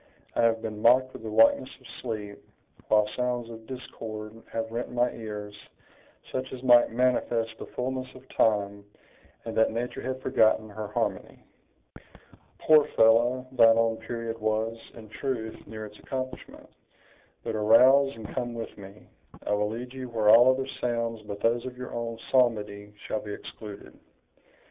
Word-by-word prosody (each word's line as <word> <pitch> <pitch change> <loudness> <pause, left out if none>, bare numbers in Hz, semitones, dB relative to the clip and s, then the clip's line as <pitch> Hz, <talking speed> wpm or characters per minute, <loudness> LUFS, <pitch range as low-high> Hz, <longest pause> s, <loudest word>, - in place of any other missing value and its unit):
I - - +2
have 115 -1 +2
been 105 -1 -5
mocked 130 +3 +4
with - - -9
the 110 - -6
likeness 115 +4 +4
of - - -21 0.2
sleep, 105 -4 -5 0.5
while 105 -1 +4
sounds 125 -2 -2
of 110 -1 -11
discord 110 -4 -7 0.2
have 115 0 -3
rent 120 +2 -4
my 125 0 +1
ears, 105 -2 -7 0.8
such 130 0 -3
as 130 -1 -8
might 120 -2 +6
manifest 120 -2 +1
the - - -7
fullness 130 +1 -3
of 130 +1 -14
time, 100 -2 +1 0.6
and 115 - -5
that 110 - +4
nature 120 +2 -4
had 130 0 -4
forgotten 110 -1 +2
her 105 +1 -5
harmony." 105 - -3 1.1
"Poor 155 -2 +5
fellow! 120 +3 +4
thine 115 -3 +6
own 115 -1 +2
period 115 0 -5
was, 110 +1 0 0.2
in 110 -2 -11
truth, 110 -1 -5
near 110 0 -7
its 105 0 -13
accomplishment! 130 -1 -6 0.8
But 115 - -3
arouse, 130 +6 +5
and 110 -2 -8
come 120 -1 -3
with 115 -1 -6
me; 100 +1 -13 0.4
I - - -2
will 105 0 +1
lead 120 +3 -6
you 130 -1 -7
where 110 -3 +1
all 120 +4 +8
other 130 +1 +1 0.2
sounds 115 -2 -1
but 100 0 -6
those 115 +1 +2
of 125 -1 -8
your 125 0 -7
own 115 -1 -4
psalmody 105 -5 +1
shall 110 - -2
be 105 - -6
excluded." 105 -1 -10
115 Hz, 160 wpm, -27 LUFS, 110-125 Hz, 1.1 s, all